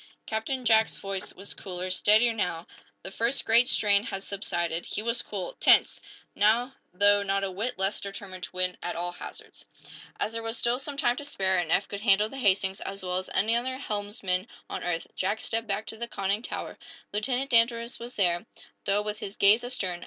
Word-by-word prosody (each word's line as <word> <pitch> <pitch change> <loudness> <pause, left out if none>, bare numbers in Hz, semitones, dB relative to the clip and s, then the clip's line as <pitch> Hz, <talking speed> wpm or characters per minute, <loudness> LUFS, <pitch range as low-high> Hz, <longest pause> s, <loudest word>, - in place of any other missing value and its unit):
Captain 235 +4 -3
Jack's 220 -1 +4
voice 195 -1 -4
was 195 +2 -7
cooler, 185 -1 -5
steadier, 215 +5 +5
now. 180 -6 -2 0.4
The - - -6
first 235 +6 0
great 235 +2 +6
strain 205 -2 +4
had 195 -3 -5
subsided. 175 -4 -2
He 210 - -3
was 235 +1 +1
cool, 190 -4 -5
tense, - - +6 0.3
now 235 +5 +2 0.2
though 205 +2 +4
not 195 0 0
a 195 - -2
whit 220 +7 -3
less 195 +2 0
determined 195 -2 -7
to - - -12
win 180 0 -1
at 175 - -3
all 175 +1 -1
hazards. 175 - -10 0.5
As 215 - -1
there 230 - -4
was 225 +1 -4
still 240 +1 0
some 280 +1 -7
time 245 -3 +2
to - - -5
spare, 190 -10 0
and 165 -2 -2
Eph 195 - +2
could 200 0 -6
handle 210 0 +4
the 270 - -9
"Hastings" 195 -3 +2
as 195 0 -6
well 180 0 -1
as 185 - -4
any 225 +3 +3
other 260 +2 -1
helmsman 205 -5 -2 0.2
on - - -5
earth, 170 -2 -2
Jack 200 +4 -1
stepped 225 0 -3
back 205 +1 -2
to 220 - -6
the 235 +1 -4
conning 200 -1 -1
tower. - - -6 0.3
Lieutenant 250 +6 -1
Danvers 235 0 +2
was 240 +1 -8
there, 175 0 +1 0.4
though 200 +1 +2
with 210 0 -4
his 195 - -7
gaze 210 +4 +5
astern. 190 -8 -3
205 Hz, 200 wpm, -27 LUFS, 190-230 Hz, 0.5 s, great